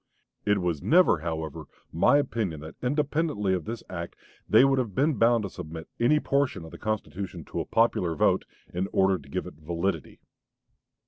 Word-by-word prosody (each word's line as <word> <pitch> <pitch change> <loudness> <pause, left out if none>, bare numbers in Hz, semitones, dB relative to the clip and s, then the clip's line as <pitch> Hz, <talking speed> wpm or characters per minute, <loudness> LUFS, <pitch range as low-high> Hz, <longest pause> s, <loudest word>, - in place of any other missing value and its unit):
It 105 0 +4
was 85 -6 -1
never, 175 - +5
however, 80 -2 -4 0.3
my 85 - +5
opinion 110 - -1
that 80 +1 -9
independently 145 - 0
of 90 -4 -2
this 115 +1 -5
act 85 -2 -6 0.3
they 130 - +7
would 135 -1 +3
have 110 -7 -3
been 150 +3 +3
bound 115 -1 +3
to 100 - -3
submit 80 +1 -8
any 125 +6 +4
portion 140 - 0
of 80 - -11
the - - -11
constitution 100 -5 -4
to - - -5
a - - -2
popular 95 -7 +2
vote, - - +2 0.3
in 90 +2 -1
order 95 -1 +3
to 70 - -16
give - - -3
it - - -8
validity." 85 0 -3
100 Hz, 180 wpm, -27 LUFS, 85-125 Hz, 0.3 s, they